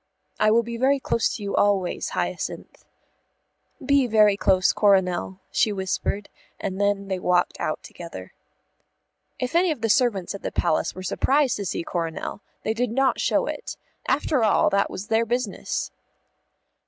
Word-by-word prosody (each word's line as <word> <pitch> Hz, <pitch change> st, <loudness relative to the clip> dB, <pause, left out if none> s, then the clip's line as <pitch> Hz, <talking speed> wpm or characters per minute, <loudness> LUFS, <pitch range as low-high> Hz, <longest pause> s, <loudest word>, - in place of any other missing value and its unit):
"I 215 Hz, -, +4 dB
will 230 Hz, +2 st, +4 dB
be 235 Hz, 0 st, -5 dB
very 270 Hz, +3 st, +3 dB
close 230 Hz, -3 st, 0 dB
to 210 Hz, -, -7 dB
you 200 Hz, -, -2 dB
always, 195 Hz, -3 st, +1 dB
Hyacinth." -, -, -4 dB, 1.0 s
"Be 280 Hz, -2 st, +3 dB
very 210 Hz, -3 st, +5 dB
close, 190 Hz, -2 st, +3 dB
Coronel," 190 Hz, -2 st, +2 dB
she 215 Hz, -, +2 dB
whispered, 200 Hz, +1 st, -2 dB, 0.3 s
and 190 Hz, +1 st, -3 dB
then 200 Hz, -1 st, +1 dB
they 190 Hz, -1 st, -2 dB
walked 180 Hz, -1 st, +1 dB
out -, -, -2 dB
together. -, -, -10 dB, 1.0 s
If 250 Hz, -1 st, -3 dB
any 350 Hz, +2 st, +4 dB
of 300 Hz, -8 st, -2 dB
the 225 Hz, -, 0 dB
servants 210 Hz, -6 st, +2 dB
at 200 Hz, -, -7 dB
the -, -, -4 dB
Palace 170 Hz, -3 st, 0 dB
were 185 Hz, -, -7 dB
surprised 265 Hz, +8 st, +2 dB
to 200 Hz, -, -4 dB
see 170 Hz, -, -2 dB
Coronel, 165 Hz, +3 st, -4 dB, 0.2 s
they 220 Hz, -, 0 dB
did 245 Hz, +2 st, -1 dB
not 265 Hz, +3 st, +1 dB
show -, -, +2 dB
it. -, -, -5 dB, 0.3 s
After 280 Hz, -3 st, +1 dB
all, 215 Hz, -, +3 dB
that 200 Hz, 0 st, +2 dB
was 190 Hz, -, -6 dB
their 225 Hz, +1 st, +3 dB
business. 240 Hz, -2 st, -2 dB
210 Hz, 160 wpm, -24 LUFS, 190-240 Hz, 1.0 s, very